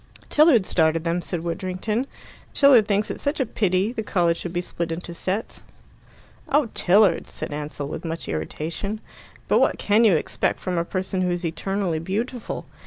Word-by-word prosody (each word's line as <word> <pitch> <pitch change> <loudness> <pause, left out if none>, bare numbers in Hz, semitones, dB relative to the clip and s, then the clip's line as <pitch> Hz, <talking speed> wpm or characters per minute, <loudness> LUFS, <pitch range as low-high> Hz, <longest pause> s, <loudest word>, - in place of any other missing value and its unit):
"Tilliard 295 - +5
started 160 -2 +2
them," 170 +1 0
said 170 -1 -4
Widdrington. 185 +8 -2 0.5
"Tilliard 260 -7 +6
thinks 205 +1 +1
it - - -6
such 285 +2 -1
a 265 - +2
pity 200 0 0
the 225 - -3
college 175 -5 +1
should 175 - -5
be 175 - -1
split 170 -1 -4
into 170 +1 -5
sets." 190 +5 -3 0.9
"Oh, 285 -4 +3
Tilliard!" 190 -1 +4
said - - -5
Ansell, 145 -1 -4
with 150 - -6
much 165 0 -4
irritation. 165 - -3 0.5
"But - - +4
what - - +2
can 210 +3 +3
you 210 -6 +6
expect 155 - -1
from 180 -2 -2
a 170 - -1
person 185 0 -2
who's 175 -1 -1
eternally 175 +1 -1
beautiful? 220 +8 -4
185 Hz, 170 wpm, -24 LUFS, 170-215 Hz, 0.9 s, Tilliard